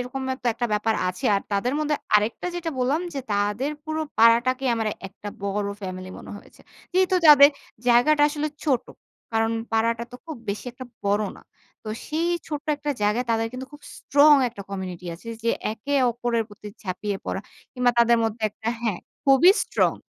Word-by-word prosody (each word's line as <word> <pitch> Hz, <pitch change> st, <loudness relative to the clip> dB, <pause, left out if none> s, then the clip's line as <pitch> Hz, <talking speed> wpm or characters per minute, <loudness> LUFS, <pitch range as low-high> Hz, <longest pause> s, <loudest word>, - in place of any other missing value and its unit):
এরকমের 260 Hz, +1 st, -3 dB
তো -, -, -3 dB
একটা 240 Hz, +1 st, -1 dB
ব্যাপার 220 Hz, +1 st, +1 dB
আছে। 180 Hz, 0 st, -6 dB
আর 195 Hz, -, -2 dB
তাদের 235 Hz, +6 st, +1 dB
মধ্যে 300 Hz, -1 st, 0 dB, 0.2 s
আরেকটা 210 Hz, +11 st, +2 dB
যেটা 335 Hz, -2 st, -3 dB
বললাম, 270 Hz, +6 st, +1 dB
যে 275 Hz, -, -2 dB
তাদের 205 Hz, +7 st, 0 dB
পুরো 315 Hz, 0 st, -2 dB, 0.2 s
পাড়াটাকে 240 Hz, +4 st, +4 dB
আমার 225 Hz, -1 st, -1 dB, 0.2 s
একটা 205 Hz, +1 st, -9 dB, 0.2 s
বড় 200 Hz, 0 st, -1 dB
ফ্যামিলি 185 Hz, -1 st, -6 dB
মনে -, -, -10 dB
হয়েছে। -, -, -16 dB, 0.3 s
যেহেতু 370 Hz, 0 st, +3 dB
যাবে 285 Hz, -1 st, +10 dB, 0.4 s
জায়গাটা 290 Hz, +5 st, +5 dB
আসলে 300 Hz, 0 st, -2 dB, 0.2 s
ছোট। 260 Hz, -5 st, +1 dB, 0.5 s
কারণ 225 Hz, 0 st, +1 dB, 0.2 s
পাড়াটা 230 Hz, +1 st, +1 dB
তো -, -, -7 dB
খুব 315 Hz, -, -6 dB
বেশি 200 Hz, -, -3 dB
একটা 255 Hz, +1 st, -9 dB, 0.2 s
বড় 205 Hz, +1 st, +2 dB
না। -, -, -16 dB, 0.4 s
তো 215 Hz, -, -8 dB, 0.2 s
সেই 325 Hz, +3 st, -1 dB, 0.2 s
ছোট্ট 300 Hz, -1 st, -5 dB
একটা 290 Hz, 0 st, -3 dB
জায়গায় 215 Hz, +5 st, +2 dB
তাদের 225 Hz, 0 st, +1 dB
কিন্তু 260 Hz, +1 st, -6 dB
খুব 295 Hz, 0 st, -13 dB
স্ট্রং 290 Hz, +1 st, +5 dB
একটা 205 Hz, -4 st, -9 dB
কমিউনিটি 185 Hz, -2 st, -6 dB
আছে, 190 Hz, +7 st, -12 dB, 0.2 s
যে 230 Hz, -, +3 dB, 0.2 s
একে 275 Hz, +6 st, -4 dB, 0.2 s
অপরের 235 Hz, -1 st, -1 dB
প্রতি 210 Hz, 0 st, -11 dB
ঝাপিয়ে 195 Hz, +1 st, -3 dB
পড়া -, -, -3 dB, 0.3 s
কিংবা 250 Hz, -2 st, +2 dB
তাদের 235 Hz, 0 st, +5 dB
মধ্যে 225 Hz, 0 st, -3 dB
একটা 220 Hz, +2 st, -6 dB
হ্যাঁ, 215 Hz, -6 st, -1 dB, 0.3 s
খুবই 275 Hz, +6 st, +7 dB
স্ট্রং। -, -, +1 dB
235 Hz, 175 wpm, -24 LUFS, 210-285 Hz, 0.5 s, যাবে